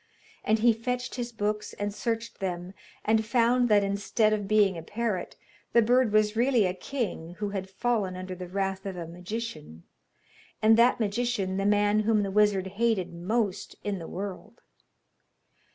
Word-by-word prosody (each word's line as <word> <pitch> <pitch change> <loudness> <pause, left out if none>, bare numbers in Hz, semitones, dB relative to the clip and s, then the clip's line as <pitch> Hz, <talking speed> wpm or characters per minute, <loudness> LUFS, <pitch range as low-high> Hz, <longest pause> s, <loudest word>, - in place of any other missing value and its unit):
And 220 - +3
he 230 +1 +4
fetched 250 +2 -3
his 240 -1 -4
books 210 -1 -2
and 205 0 -3
searched 230 +1 -3
them, 180 -1 -4 0.3
and 220 +1 +3
found 240 +2 +2
that 205 -1 +5
instead 205 +2 +1
of 205 -2 -2
being 205 -2 +4
a 165 - -5
parrot, 210 +1 -3 0.4
the 235 - +6
bird 245 0 +3
was 215 0 +3
really 240 -2 +3
a 180 - 0
king 185 -6 -4
who 210 -1 -2
had 190 -1 -4
fallen 205 -2 -1
under 185 0 -6
the 180 0 -7
wrath 195 +1 -2
of 190 -2 -5
a 170 - -4
magician, 175 - -7 0.8
and 220 +1 +5
that 235 +2 +4
magician 210 -3 -1
the 195 +1 +1
man 205 0 +3
whom 215 -1 +2
the 195 - -3
wizard 205 -2 +3
hated 195 -2 0
most 200 +4 -2
in 200 -2 -2
the 165 - -7
world. 195 0 -7
210 Hz, 170 wpm, -28 LUFS, 190-230 Hz, 0.8 s, the